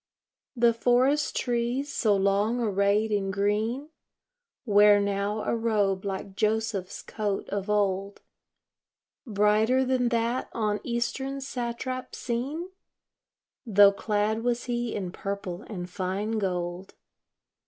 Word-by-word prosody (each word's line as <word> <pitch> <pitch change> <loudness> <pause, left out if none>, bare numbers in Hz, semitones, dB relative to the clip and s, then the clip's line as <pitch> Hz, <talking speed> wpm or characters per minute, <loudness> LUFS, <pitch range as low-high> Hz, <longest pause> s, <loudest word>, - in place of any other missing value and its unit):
The 235 -1 +4
forest 255 +5 +2
trees, 245 +3 -1
so 215 -6 +2
long 200 +4 +1
arrayed 205 0 +1
in 200 -2 0
green, 215 +8 -1 0.8
Wear 205 -1 +6
now 200 +1 -1
a - - 0
robe 205 -4 0
like 195 0 -5
Joseph's 215 -3 -1
coat 205 -3 -3
of 200 0 -3
old, 200 -1 0 1.0
Brighter 215 +5 +3
than 255 -1 +1
that 235 +2 -1
on 210 -2 0
eastern 265 +3 -2
satrap 255 -1 -4
seen, 275 +9 -3 0.9
Tho' 205 -4 +6
clad 210 +2 -1
was 240 0 0
he 240 -2 -2
in 185 -4 -3
purple 195 -2 -5
and 180 -5 -5
fine 195 +4 -2
gold. 180 -1 -3
215 Hz, 110 wpm, -27 LUFS, 200-240 Hz, 1.0 s, Wear